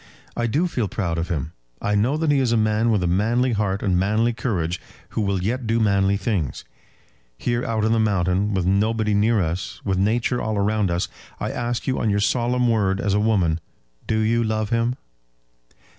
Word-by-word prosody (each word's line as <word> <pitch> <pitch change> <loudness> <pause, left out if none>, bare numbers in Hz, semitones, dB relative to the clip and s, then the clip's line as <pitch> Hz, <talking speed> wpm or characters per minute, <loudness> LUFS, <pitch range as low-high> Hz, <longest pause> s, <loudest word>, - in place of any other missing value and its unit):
I 120 0 0
do 145 +10 +1
feel 120 -10 -1
proud 85 -5 -2
of 85 - -2
him. 80 -2 -2 0.3
I 105 - -1
know 115 +9 +2
that 155 -1 +1
he 140 - +3
is 130 -3 +1
a 120 - +3
man 110 +1 +2
with 105 -5 +2
a - - +1
manly 115 +8 +2
heart 100 -3 -1
and 90 -3 +2
manly 110 +5 +1
courage, 95 -8 -2 0.3
who - - -2
will 100 -3 0
yet 120 +4 -2
do 115 +1 +2
manly 100 -2 +2
things. 95 - -2 0.7
Here 120 0 -1
out 110 -2 0
on 110 - +2
the 115 - +3
mountain, 100 -1 +1
with 95 -2 0
nobody 105 +3 +1
near 105 +2 +3
us, 85 +2 -3
with 95 -2 0
Nature 115 +5 +1
all 110 -2 -1
round 105 -1 +1
us, 85 +1 0 0.3
I - - -2
ask 120 0 -3
you 130 - 0
on 110 - 0
your 100 0 +2
solemn 125 +3 +1
word 100 -4 +1
as 100 0 0
a 105 - +3
woman, 95 -7 +2 0.5
do 110 - +1
you 115 +2 +2
love 110 0 -1
him?" 115 +1 +1
110 Hz, 205 wpm, -23 LUFS, 95-115 Hz, 0.7 s, he